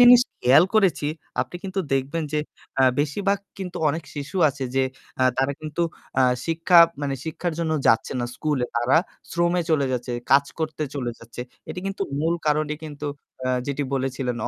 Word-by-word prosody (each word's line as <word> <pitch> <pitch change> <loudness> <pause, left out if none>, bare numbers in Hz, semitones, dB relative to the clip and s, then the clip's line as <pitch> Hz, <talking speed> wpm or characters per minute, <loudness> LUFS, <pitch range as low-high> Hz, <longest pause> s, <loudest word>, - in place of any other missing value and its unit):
জিনিস 245 0 +10 0.2
খেয়াল 135 +7 +7
করেছি, 190 -8 +3 0.3
আপনি 175 - -4
কিন্তু 195 0 -1
দেখবেন 135 +5 0
যে 150 - +1 0.4
আ - - +6 0.2
বেশিরভাগ 195 +8 +1 0.2
কিন্তু 185 -2 -5
অনেক 160 +3 -1
শিশু 145 +6 -5
আছে 135 -1 -4
যে 135 - +3 0.4
আ - - +5
তারা 135 +1 +2
কিন্তু 155 +2 -2 0.4
আ - - +6 0.2
শিক্ষা 165 +2 +4 0.2
মানে 140 -1 0
শিক্ষার 165 +2 -2
জন্য 165 -2 0
যাচ্ছে 115 +3 +3
না 120 - -1
স্কুলে। 150 -5 0
তারা 120 +5 +3 0.3
শ্রমে 175 +1 +2
চলে 145 -3 +3
যাচ্ছে, 125 0 -2 0.2
কাজ 140 +1 +6
করতে 155 -1 -2
চলে 125 -4 -2
যাচ্ছে। 115 +1 -10 0.3
এটি 180 - -5
কিন্তু 195 0 -2 0.2
মূল 165 +2 +2
কারণই 150 0 +1
কিন্তু 150 -1 -6 0.4
আ - - +1 0.2
যেটি 145 0 -1
বলেছিলেন 130 -2 -1
150 Hz, 170 wpm, -24 LUFS, 135-170 Hz, 0.4 s, জিনিস